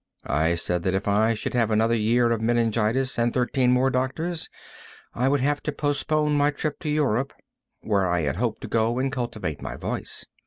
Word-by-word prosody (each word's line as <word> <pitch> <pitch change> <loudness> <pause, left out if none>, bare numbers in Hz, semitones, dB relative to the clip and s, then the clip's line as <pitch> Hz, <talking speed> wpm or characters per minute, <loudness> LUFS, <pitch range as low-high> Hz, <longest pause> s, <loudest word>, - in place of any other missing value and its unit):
I 80 +4 +1
said 90 +1 -1
that 95 +2 0
if 95 +2 -2
I 110 +3 +3
should 105 - -4
have 115 -3 +2
another 110 +1 +2
year 115 +2 +2
of 115 -1 0
meningitis 120 +2 +1
and 120 0 +2
thirteen 125 0 +1
more 130 +1 +3
doctors, 160 +7 -2 0.6
I 125 +2 0
would 140 0 +2
have 145 +2 +1
to - - -2
postpone 150 +1 0
my 145 0 +4
trip 150 0 -3
to 155 - -4
Europe, 140 -4 +1 0.5
where 100 -3 +1
I 90 -1 +1
had 70 0 -1
hoped 115 0 -1
to - - -6
go 115 +1 +1
and 135 +1 0
cultivate 115 - -4
my - - -5
voice. - - -5
120 Hz, 195 wpm, -25 LUFS, 110-135 Hz, 0.6 s, my